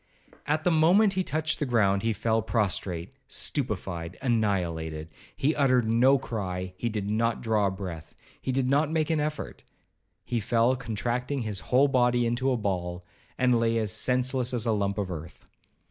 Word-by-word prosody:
At 155 +1 0
the 180 - +3
moment 180 +6 +4
he 190 0 0
touched 155 -1 -1
the 150 - 0
ground, 100 -5 +2
he 115 - +1
fell 110 +2 0
prostrate, 100 -3 -1
stupefied, 95 - -3
annihilated. 85 - -1 0.3
He 150 +4 +1
uttered 130 -5 +3
no 125 +5 +4
cry—he 95 -3 -4
did 105 -3 -3
not 115 +2 0
draw 110 -3 +1
a - - +1
breath—he 95 +5 -7
did 130 0 0
not 145 +3 +2
make 160 0 0
an 160 - +1
effort—he 150 -4 -6
fell 115 +4 +2
contracting 125 +2 -2
his 105 -3 -2
whole 130 +7 +3
body 125 -2 +2
into 120 +3 0
a 130 - +1
ball, 90 -4 -3 0.3
and 125 -2 +3
lay 115 0 +1
as 110 -3 0
senseless 125 +2 +1
as 115 - 0
a 115 - +2
lump 100 -1 0
of 100 -3 -2
earth. 80 -2 -8
115 Hz, 160 wpm, -27 LUFS, 100-130 Hz, 0.3 s, moment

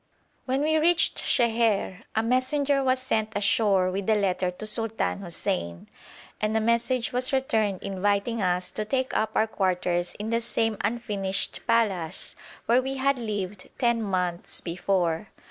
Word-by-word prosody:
When 265 +2 0
we 315 +1 +2
reached 335 +2 +3
Sheher, 225 -6 +1
a 220 - +2
messenger 275 +3 +1
was 260 0 +2
sent 220 -4 -1
ashore 200 -2 +2
with 195 +2 -3
a 220 - +5
letter 185 -3 +1
to 180 +4 -7
Sultan 225 -1 0
Hussein, 170 - -3 0.5
and 215 +1 +1
a - - +3
message 235 +2 +1
was 255 +3 0
returned 220 -8 0
inviting 200 +3 0
us 180 -1 0
to 215 - -3
take 260 +4 -1
up 220 - 0
our 220 - +4
quarters 180 -4 -1
in 215 +2 -5
the 230 0 +1
same 225 -1 0
unfinished 205 -4 -1
palace 190 -7 +1 0.3
where 240 +2 +4
we 270 +1 -4
had 275 0 +1
lived 205 -4 -4
ten 235 -2 +2
months 180 -4 -1
before. 175 +1 -1
215 Hz, 150 wpm, -26 LUFS, 190-240 Hz, 0.5 s, a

